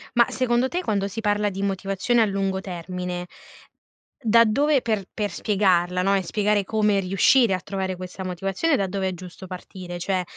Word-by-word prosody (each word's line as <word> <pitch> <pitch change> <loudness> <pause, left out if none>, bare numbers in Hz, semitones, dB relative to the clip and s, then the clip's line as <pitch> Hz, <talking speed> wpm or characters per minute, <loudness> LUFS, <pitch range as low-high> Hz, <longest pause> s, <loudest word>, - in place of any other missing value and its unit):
Ma, 240 0 +6
secondo 250 0 +1
te 355 +6 -2
quando 200 - -1
si 225 +3 -5
parla 210 -1 +1
di 195 0 -5
motivazione 195 +4 0
a - - +5
lungo 195 -1 -1
termine, 180 0 -5 0.9
da 230 -1 +5
dove 280 +5 +2
per 215 -4 -1
per 210 -1 -2
spiegarla, 180 -4 +1
no, 195 +1 +3
e 190 - 0
spiegare 205 +2 +1
come 210 -1 +2
riuscire 195 +5 +4
a 185 - 0
trovare 190 -1 -3
questa 185 +1 -7
motivazione 195 - 0
da 195 - 0
dove 190 0 -2
è - - -4
giusto 180 +1 -10
partire. 180 -1 -8
Cioè, 185 0 -1
195 Hz, 180 wpm, -24 LUFS, 185-215 Hz, 0.9 s, Ma